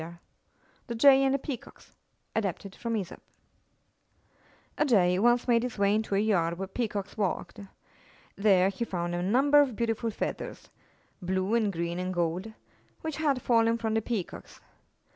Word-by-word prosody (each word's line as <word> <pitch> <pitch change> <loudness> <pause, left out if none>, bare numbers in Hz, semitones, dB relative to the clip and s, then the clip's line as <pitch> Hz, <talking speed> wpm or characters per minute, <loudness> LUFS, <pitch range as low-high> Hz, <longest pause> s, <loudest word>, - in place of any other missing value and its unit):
THE 235 - -4
JAY 270 +3 +6
AND 270 - +3
THE 275 - +2
PEACOCKS 270 -3 -9 0.4
A 200 -6 0 2.3
Jay 180 -7 +3
once 240 +3 +3
made 235 -1 +4
his 250 -1 -4
way 200 0 +3
into 215 -2 0
a - - +3
yard 175 -6 +1
where 195 +1 -4
Peacocks 205 -2 -4
walked. 195 -4 -3 0.8
There 195 -2 +4
he 200 +4 -4
found 175 -5 -3
a 175 - -2
number 270 +10 +4
of 265 -6 0
beautiful 230 0 -1
feathers 220 - -5 0.3
— - - -38
blue 190 +3 -1
and 220 -3 +2
green 170 0 -3
and 185 0 -2
gold 175 +4 -2 0.2
— - - -35
which 315 -2 -4
had 285 -5 0
fallen 230 -1 +3
from 225 -1 -2
the 220 - +1
Peacocks. 215 -5 -5
215 Hz, 150 wpm, -28 LUFS, 185-240 Hz, 2.3 s, JAY